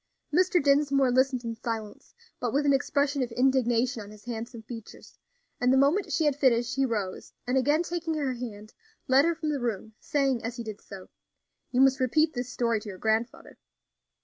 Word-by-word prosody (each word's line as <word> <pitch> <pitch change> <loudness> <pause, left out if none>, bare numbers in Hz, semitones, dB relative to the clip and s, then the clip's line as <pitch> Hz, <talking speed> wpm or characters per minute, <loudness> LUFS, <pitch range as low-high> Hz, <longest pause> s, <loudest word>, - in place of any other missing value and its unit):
Mr. 360 +2 +3
Dinsmore 280 -2 +3
listened 260 0 +2
in 230 -1 -3
silence, 225 -2 -6 0.2
but 245 - -1
with 285 +4 +1
an 280 - +4
expression 280 +1 +1
of 245 -2 -2
indignation 250 -1 +2
on 205 - -10
his 210 +1 -15
handsome 230 -1 -6
features; 225 -1 -11 0.4
and 250 +1 +3
the 265 - +4
moment 290 +9 +2
she 320 - +1
had 295 -2 +2
finished 245 -3 +2
he 270 0 +2
rose, 205 -6 -4
and 250 +1 -1
again 290 +5 +3
taking 340 -2 -3
her 280 -4 -1
hand, 220 -3 -8 0.3
led 265 +3 +5
her 335 0 +1
from 315 -1 -3
the 290 -2 -1
room, 220 -3 -3
saying, 275 -5 0
as 230 +1 -4
he 235 - -5
did 215 -2 -8
so: 195 -2 -11 0.6
"You 255 0 +2
must 270 0 +4
repeat 305 +5 +2
this 245 -1 -4
story 230 -3 0
to 210 - -9
your 190 - -8
grandfather." 220 +3 -2
255 Hz, 195 wpm, -27 LUFS, 230-280 Hz, 0.6 s, led